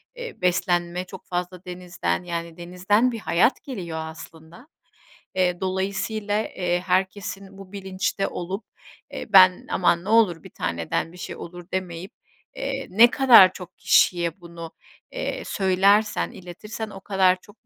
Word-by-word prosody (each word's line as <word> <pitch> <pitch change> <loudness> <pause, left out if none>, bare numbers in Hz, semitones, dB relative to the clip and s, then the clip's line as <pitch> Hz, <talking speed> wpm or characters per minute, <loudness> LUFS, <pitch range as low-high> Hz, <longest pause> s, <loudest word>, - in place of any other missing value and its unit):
eee, 485 - -8
beslenme 175 0 0
çok 190 0 -12
fazla 180 +1 -4
denizden, 180 0 -3
yani, 170 -1 -5
denizden 190 +8 +1
bir 230 - -5
hayat 190 +5 +2
geliyor 175 - -5
aslında. 160 - -11 0.7
Eee, 180 -1 +1
dolayısıyla, 200 +3 -2
eee, 175 -1 0
herkesin 190 +1 -2
bu 195 -1 -12
bilinçte 190 -1 -2
olup, 190 +5 -5 0.5
eee, - - -5
ben 185 -1 +6
"aman 175 -1 +2
ne 210 - -5
olur 205 -8 +3
1 - - -11
taneden 85 - -3
bir - - -13
şey - - -7
olur 175 0 -10
demeyip" 185 +2 -4 0.4
eee, 270 -1 -4
ne 225 +6 +7
kadar 235 -9 +7
çok 180 -1 -11
kişiye 170 0 +2
bunu, 170 -1 -9 0.4
eee, - - -4
söylersen, 200 +2 +2
iletirsen 210 +5 -8
o 195 -2 -10
kadar 185 -2 +2
çok 210 +2 -20
185 Hz, 140 wpm, -24 LUFS, 175-205 Hz, 0.7 s, ne